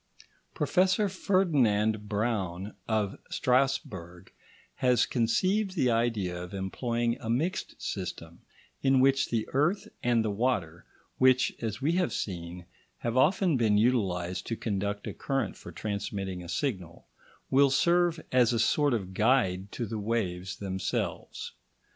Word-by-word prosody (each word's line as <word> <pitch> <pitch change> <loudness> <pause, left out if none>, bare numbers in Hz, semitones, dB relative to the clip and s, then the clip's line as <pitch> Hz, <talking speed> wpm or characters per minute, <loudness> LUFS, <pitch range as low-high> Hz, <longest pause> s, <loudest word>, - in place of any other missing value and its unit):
Professor 190 +2 +2
Ferdinand 120 - +1
Braun 100 -3 -2
of 105 -3 -1
Strasburg 95 -9 -1 0.4
has 125 -2 +3
conceived 185 - +1
the 130 -8 +2
idea 110 -7 0
of 90 +2 -7
employing 115 +5 -1
a 115 - -6
mixed 160 +11 -1
system, 85 -3 -5 0.4
in 135 -1 +4
which 135 +1 +3
the 115 -2 -1
earth 155 +9 +1
and 120 -2 +2
the 105 - 0
water, 100 -7 -1 0.3
which, 130 -2 +4
as 115 +2 -4
we 155 - +3
have 175 -9 +1
seen, 90 -3 -5 0.3
have 120 0 -3
often 170 +3 +3
been 110 -3 +3
utilised 95 -6 0
to 115 - -2
conduct 100 -1 -3
a - - -4
current 135 -1 -2
for - - -11
transmitting 100 -3 -4
a 85 - -10
signal, 90 - -3 0.5
will 140 +1 +5
serve 170 +4 +3
as 125 -2 +4
a 120 - +1
sort 145 +3 +3
of 95 -4 -4
guide 100 -4 +2
to 120 - -3
the 110 0 -4
waves 95 -4 -2
themselves. 95 -2 -3
115 Hz, 135 wpm, -29 LUFS, 95-135 Hz, 0.5 s, will